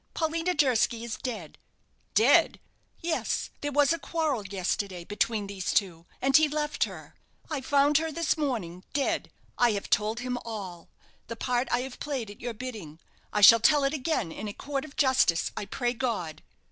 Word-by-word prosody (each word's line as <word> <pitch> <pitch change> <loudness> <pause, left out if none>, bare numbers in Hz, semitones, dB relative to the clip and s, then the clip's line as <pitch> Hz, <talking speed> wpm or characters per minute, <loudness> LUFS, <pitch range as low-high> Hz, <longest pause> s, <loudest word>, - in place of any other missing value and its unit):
Paulina 330 +2 0
Durski 240 -4 +2
is 235 -2 -4
dead!" 215 - -6 0.6
"Dead!" - - +5 0.4
"Yes. 335 -1 -1
There 290 - -2
was 290 +2 +4
a 335 - -3
quarrel, 295 - -2
yesterday, 190 -1 -2
between 210 +2 -1
these 195 -2 -3
two 175 -4 0 0.2
and 270 0 +3
he 310 +1 +7
left 300 0 -1
her. - - -11 0.4
I 295 -3 -2
found 285 +2 +3
her 320 0 -3
this 335 +1 0
morning 215 - -3
dead! 280 -1 0 0.3
I 240 -2 +4
have 200 - -5
told 220 +2 +1
him 250 0 -3
all 190 -7 -7 0.4
the 230 - -5
part 245 +2 -1
I 240 - +1
have 265 0 -7
played 260 -8 -4
at 205 - -14
your 240 -1 -4
bidding. 210 -11 -7 0.3
I 210 - 0
shall 230 +3 +10
tell 290 +5 +4
it 275 +1 +1
again 275 - -1
in 215 - -6
a 205 - -5
court 275 +4 -4
of 295 - -13
justice, 260 - +3
I - - -4
pray 240 +4 -1
God!" 225 -10 -3
245 Hz, 180 wpm, -28 LUFS, 205-290 Hz, 0.6 s, shall